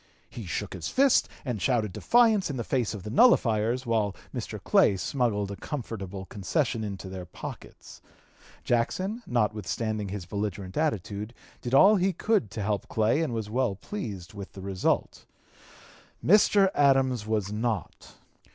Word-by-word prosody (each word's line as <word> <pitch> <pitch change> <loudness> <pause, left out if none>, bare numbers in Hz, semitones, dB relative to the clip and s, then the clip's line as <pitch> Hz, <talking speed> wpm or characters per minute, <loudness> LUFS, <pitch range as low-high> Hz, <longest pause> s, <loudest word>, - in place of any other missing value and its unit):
He - - -8
shook - - -3
his - - -5
fist 275 0 +3 0.2
and 120 -7 -3
shouted 115 -7 +1
defiance 225 -6 +3
in 140 - -3
the 120 - -2
face 120 -4 -1
of 100 - -8
the 105 - -6
nullifiers, 120 - +3
while 110 -4 0 0.2
Mr. - - -5
Clay 95 - +3
smuggled 105 -2 -1
a - - -5
comfortable 100 -8 -6
concession 115 - -1
into 100 -2 -5
their 95 -2 -7
pockets. - - -10 0.6
Jackson, 185 - 0
notwithstanding 110 -2 -1
his 95 -2 -5
belligerent 100 -1 -4
attitude, 110 - -2 0.3
did 125 +2 -1
all 205 +9 +7
he 190 +1 +1
could 215 +3 +1
to 105 - -5
help 100 -2 -1
Clay 110 +7 +1
and 160 -6 -1
was 110 -3 -3
well 125 -4 0
pleased 100 - -6
with 100 -1 -9
the 95 - -9
result. 95 -1 -1 1.0
Mr. 200 +1 +5
Adams 135 -5 +3
was 105 -3 -1
not. 110 -3 -3
110 Hz, 150 wpm, -27 LUFS, 100-135 Hz, 1.0 s, all